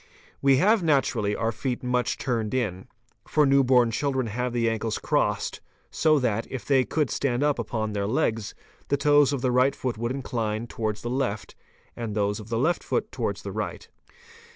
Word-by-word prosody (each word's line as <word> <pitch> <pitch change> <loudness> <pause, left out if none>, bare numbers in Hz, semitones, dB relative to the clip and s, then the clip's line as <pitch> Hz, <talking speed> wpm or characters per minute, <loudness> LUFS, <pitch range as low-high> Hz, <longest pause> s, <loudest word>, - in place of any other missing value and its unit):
We 135 -1 +5
have 210 +7 +4
naturally 130 -10 +1
our 115 0 0
feet 125 +3 -3
much 125 0 0
turned 115 -3 -2
in, 100 -7 -2 0.4
for 150 - +3
new 140 0 +4
born 125 -2 +4
children 130 +1 0
have 125 +3 -2
the 120 -1 0
ankles 110 -1 -1
crossed, - - -1 0.3
so 155 -1 +3
that, 115 -5 0
if 130 - -6
they 135 -3 +3
could 150 -4 0
stand 130 -1 0
up 145 -3 +1
upon 110 -1 -2
their 100 -1 -1
legs, 115 -3 -1 0.3
the 140 - +1
toes 145 0 +4
of 140 -3 -2
the 130 -1 +1
right 130 +2 +3
foot 125 -4 -3
would 120 +1 -1
incline 115 -4 -2
towards 110 -2 -4
the 120 - -3
left 125 -6 -2 0.4
and 115 -3 -4
those 105 0 0
of 110 0 -10
the 115 - -1
left 160 +9 +1
foot - - -2
towards - - -3
the - - -5
right. - - -5
125 Hz, 190 wpm, -26 LUFS, 110-135 Hz, 0.4 s, We